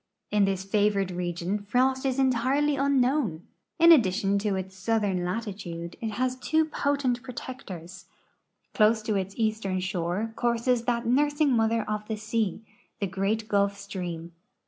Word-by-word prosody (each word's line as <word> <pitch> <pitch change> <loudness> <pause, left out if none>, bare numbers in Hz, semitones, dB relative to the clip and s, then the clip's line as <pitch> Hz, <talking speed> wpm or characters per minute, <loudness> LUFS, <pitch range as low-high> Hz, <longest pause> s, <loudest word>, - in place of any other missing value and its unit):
In 210 -1 +4
this 195 -1 -1
favored 200 -1 +1
region 175 +2 -2
frost 260 +6 +1
is 260 0 -1
entirely 270 +3 +2
unknown. 260 - +1 0.3
In 335 +1 +7
addi 235 - +6
tion 200 +1 +1
to 205 -1 0
its 190 0 -5
southern 195 -2 0
latitude, 180 -4 -5
it 220 -2 -3
has 255 +3 0
two 315 +4 +2
potent 280 -5 0
protectors. 190 -9 -8 0.7
Close 220 0 +3
to 215 - -1
its 195 0 -2
eastern 215 -4 0
shore 185 +4 -2
courses 235 0 +1
that 235 -1 0
nursing 290 +4 +2
mother 225 -1 +2
of 210 0 -3
the 220 - -3
sea, 220 -1 -2 0.4
the 200 - 0
great 195 +4 -1
Gulf 200 -1 +1
stream. 175 -4 -6
215 Hz, 145 wpm, -27 LUFS, 190-250 Hz, 0.7 s, In